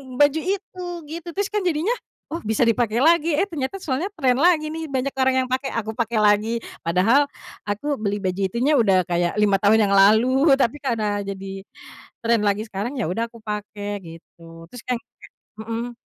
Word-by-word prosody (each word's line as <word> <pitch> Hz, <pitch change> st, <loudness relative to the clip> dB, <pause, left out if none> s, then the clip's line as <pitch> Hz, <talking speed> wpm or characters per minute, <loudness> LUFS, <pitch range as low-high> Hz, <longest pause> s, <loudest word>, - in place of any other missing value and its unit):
baju 290 Hz, +3 st, +4 dB
itu, 375 Hz, 0 st, -4 dB, 0.3 s
gitu. 335 Hz, +2 st, -7 dB
Terus 405 Hz, 0 st, -1 dB
kan 420 Hz, -, +1 dB
jadinya 335 Hz, +6 st, 0 dB, 0.4 s
oh, 330 Hz, -, -3 dB
bisa 220 Hz, 0 st, 0 dB
dipakai 230 Hz, 0 st, +2 dB
lagi 330 Hz, +1 st, +4 dB
eh 390 Hz, +7 st, +1 dB
ternyata 320 Hz, +5 st, -4 dB
soalnya 270 Hz, +4 st, -1 dB
trend 255 Hz, -7 st, +1 dB
lagi 310 Hz, 0 st, +3 dB
nih, 320 Hz, +1 st, -5 dB
banyak 275 Hz, -2 st, -1 dB
orang 260 Hz, 0 st, +3 dB
yang 255 Hz, -, -4 dB
pakai, 260 Hz, +1 st, -2 dB
aku 220 Hz, -1 st, -4 dB
pakai 230 Hz, -2 st, 0 dB
lagi. 215 Hz, +3 st, +2 dB, 0.2 s
Padahal 205 Hz, +12 st, +4 dB, 0.4 s
aku 240 Hz, +8 st, -2 dB
beli 205 Hz, -1 st, -2 dB
baju 185 Hz, -1 st, -2 dB
itunya 250 Hz, +9 st, +1 dB
udah 195 Hz, -6 st, +4 dB
kayak 175 Hz, 0 st, +1 dB
5 200 Hz, -2 st, +4 dB
tahun 205 Hz, +1 st, +3 dB
yang -, -, +2 dB
lalu 250 Hz, +9 st, +5 dB
tapi 270 Hz, 0 st, +1 dB
karena 215 Hz, -7 st, -2 dB
jadi 195 Hz, 0 st, -7 dB, 0.6 s
trend 230 Hz, -2 st, +2 dB
lagi 205 Hz, +1 st, +1 dB
sekarang, 205 Hz, +7 st, -4 dB
ya 185 Hz, -, -1 dB
udah 225 Hz, +6 st, -1 dB
aku 230 Hz, -, -15 dB
pakai, 210 Hz, -1 st, -5 dB
gitu. 165 Hz, 0 st, -13 dB
Terus 245 Hz, +3 st, -10 dB
nyampe 250 Hz, -2 st, -2 dB, 0.6 s
mhm. 230 Hz, +2 st, -4 dB
230 Hz, 180 wpm, -22 LUFS, 205-285 Hz, 0.6 s, lalu